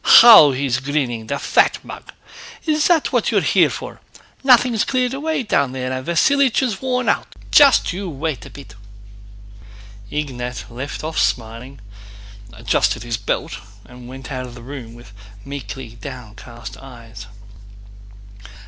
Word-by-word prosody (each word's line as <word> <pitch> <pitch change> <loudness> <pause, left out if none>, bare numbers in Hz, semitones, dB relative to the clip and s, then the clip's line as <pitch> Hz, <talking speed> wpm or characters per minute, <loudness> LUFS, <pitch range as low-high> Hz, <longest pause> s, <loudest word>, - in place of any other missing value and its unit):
"How 225 -11 +9
he's 130 -1 -1
grinning, 130 -5 -3
the 140 - -2
fat - - +2
mug! - - -10 0.5
Is 305 -1 +1
that 335 -4 +2
what - - +1
you're - - +2
here - - +3
for? - - -8 0.4
Nothing's 245 -4 +4
cleared 255 -1 -1
away 300 0 -2
down 140 - 0
there 130 -1 -4
and 130 0 -5
Vasílich 265 - +2
is 225 -7 -2
worn 255 -1 -1
out. - - +1 0.2
Just 280 -10 +5
you 190 0 -5
wait 150 -4 -4
a - - -11
bit!" 140 - -13 1.4
Ignát 125 -5 -5
left 130 +6 -6
off 160 +1 -3
smiling, 120 +3 -2 0.7
adjusted 110 0 0
his 120 -2 -3
belt, 105 - -3 0.3
and 125 +1 -13
went 130 +1 -10
out 130 -1 -5
of 120 - -12
the 120 - -12
room 125 -3 -9
with 120 -4 -15 0.3
meekly 135 -3 -7
downcast 120 -1 -10
eyes. 115 -6 -12
135 Hz, 140 wpm, -19 LUFS, -, 1.4 s, How